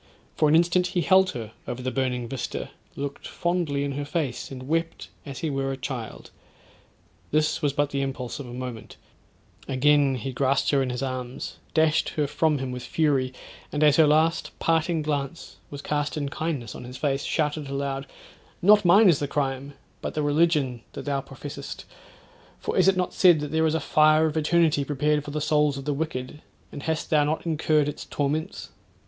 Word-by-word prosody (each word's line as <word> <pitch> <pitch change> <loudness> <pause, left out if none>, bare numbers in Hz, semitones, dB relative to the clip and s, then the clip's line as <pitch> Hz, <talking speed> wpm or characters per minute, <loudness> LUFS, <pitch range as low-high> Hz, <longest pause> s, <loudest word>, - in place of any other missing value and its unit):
For 155 - +3
an 155 - +5
instant 175 +2 +3
he 180 0 -1
held 190 +1 +5
her 110 -2 -7 0.2
over 125 +1 -5
the 130 - -1
burning 125 -3 -1
vista, 130 +1 -5 0.2
looked 140 0 -5
fondly 170 -5 -1
in 140 - -2
her 145 +1 -3
face 145 -4 -3
and 130 -1 -8
wept 165 +2 -2 0.2
as 135 -2 -6
he 155 - 0
were 135 0 -1
a 135 - -4
child. 130 -4 -6 1.0
This 155 +2 +1
was 145 -3 +2
but 145 0 0
the 140 - -1
impulse 135 -2 -4
of 140 - -7
a - - -9
moment; 125 -2 -7 0.7
again 140 0 +3
he 130 +2 -4
grasped 135 +2 +1
her 140 -2 +3
in 130 - -1
his 125 +1 -3
arms, 130 -1 -5 0.2
dashed 160 -1 +3
her 150 - +2
from 150 +1 +1
him 130 -1 -4
with 125 0 -5
fury; 135 -1 +1 0.4
and 150 +1 0
as 150 -1 +5
her 160 -2 +6
last 160 +3 +2
parting 165 0 +1
glance 145 +1 -4
was 145 0 -8
cast 150 +1 -1
in 145 -2 -2
kindness 145 -7 -3
on - - -9
his 125 +1 -8
face, 140 -2 0
shouted 150 -2 -1
aloud, 140 0 -3 0.5
'not 205 +3 +6
mine 195 +5 +6
is 170 -6 +5
the 145 - -1
crime, 140 0 -2 0.3
but - - -4
the 155 - 0
religion 145 -5 +2
that - - -7
thou 140 -1 0
professest; 140 +1 -8 0.7
for - - -3
is - - +4
it 195 -1 +4
not 180 -1 -1
said 175 -4 +6
that 145 -1 -4
there 160 0 +2
is 155 - 0
a - - +1
fire 155 0 +4
of 155 -1 -1
eternity 160 -1 +3
prepared 150 +1 0
for 145 - -8
the 150 +1 -2
souls 150 -1 +2
of 135 - -7
the 145 - 0
wicked; 145 -1 -4 0.3
and 145 - -7
hast 160 +1 -2
not 150 0 +2
thou 170 - -3
incurred 155 -1 +2
its 150 - -5
torments?' 155 +6 -2
145 Hz, 195 wpm, -25 LUFS, 135-155 Hz, 1.0 s, her